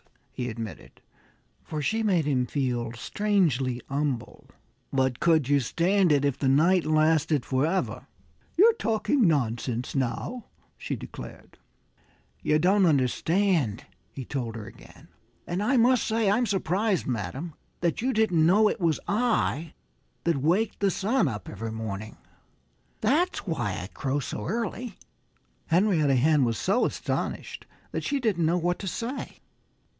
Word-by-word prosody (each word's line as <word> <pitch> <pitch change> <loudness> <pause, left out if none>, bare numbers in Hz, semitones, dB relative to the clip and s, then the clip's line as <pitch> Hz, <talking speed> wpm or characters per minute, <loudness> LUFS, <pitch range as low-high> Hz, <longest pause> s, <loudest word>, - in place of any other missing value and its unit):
he 125 0 -4
admitted 115 -2 -8 0.6
for 155 - -5
she 225 +8 0
made 185 -8 +2
him 130 -4 +1
feel 120 -5 -1
strangely 135 - 0
humble. 140 -3 -3 0.4
"But 130 -2 0
could 160 -5 +3
you 145 0 +4
stand 175 - +2
it 145 -1 +3
if 140 -3 0
the 135 - 0
night 165 +7 +4
lasted 155 -2 +2
forever?" 155 +8 -1 0.5
"You're 445 +6 +7
talking 230 - +1
nonsense 120 -4 -1
now," 135 - -2 0.3
she - - -4
declared. - - -10 0.8
"You 150 - +2
don't 185 +4 +4
understand," 150 - +1 0.3
he 130 - -7
told 120 -5 -4
her 110 -2 -7
again. - - -15 0.4
"And 175 +3 -2
I 250 +6 +2
must 245 +1 +4
say 220 -2 +2
I'm 235 +3 +2
surprised, 195 +1 0
madam, 130 - -4 0.3
that 170 +3 0
you 260 +3 +1
didn't 215 -9 +2
know 200 +6 +5
it 210 - -2
was 165 -3 +2
I 205 - 0 0.5
that 170 -3 +1
waked 180 +10 +1
the 200 - +2
sun 205 - +1
up 105 -5 -5
every 115 0 -5
morning. 110 -1 -6 0.8
That's 345 +7 +1
why 140 - -2
I 90 - -6
crow 135 +2 -1
so 115 -5 -5
early." 230 +3 -3 0.7
Henrietta 165 -6 +3
Hen 145 +2 +4
was 115 -3 0
so 200 +6 +2
astonished - - -4 0.2
that - - -3
she 285 -1 0
didn't 195 -10 +1
know 170 +2 +2
what 175 +1 -1
to 195 - -5
say. 235 +8 -5
160 Hz, 140 wpm, -27 LUFS, 130-205 Hz, 0.8 s, You're